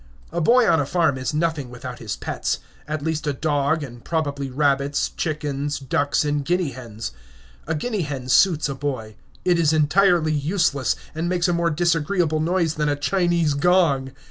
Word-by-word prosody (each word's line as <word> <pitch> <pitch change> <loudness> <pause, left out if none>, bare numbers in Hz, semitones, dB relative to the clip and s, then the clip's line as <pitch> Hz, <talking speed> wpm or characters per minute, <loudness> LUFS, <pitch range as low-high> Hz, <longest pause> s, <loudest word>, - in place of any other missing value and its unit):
A 170 +1 -1
boy 240 +7 +5
on 165 -1 +4
a 145 - +1
farm 165 -5 +2
is 130 - -2
nothing 155 -4 -1
without 125 0 -8
his 110 -4 -4
pets; - - -2 0.3
at 155 -1 -3
least 160 -1 -2
a 145 - +1
dog, 145 +1 0
and 120 -3 -9
probably 145 -4 -2
rabbits, 140 +1 +1
chickens, 145 -2 -3
ducks, 145 +2 0
and 145 -1 0
guinea 175 -1 0
hens. 115 - -7 0.6
A 160 - 0
guinea 210 +6 -2
hen 140 -5 -4
suits 160 +3 +4
a 140 - -3
boy. 130 -6 -4 0.3
It 175 -2 +3
is 160 -2 +3
entirely 160 +1 +3
useless, 145 -2 +1 0.2
and 165 +2 -2
makes 180 0 +1
a 175 - +1
more 170 0 +1
disagreeable 165 0 +1
noise 165 0 +1
than 150 -1 0
a 145 - +1
Chinese 170 0 +1
gong. 140 -4 +2
150 Hz, 175 wpm, -23 LUFS, 140-170 Hz, 0.6 s, boy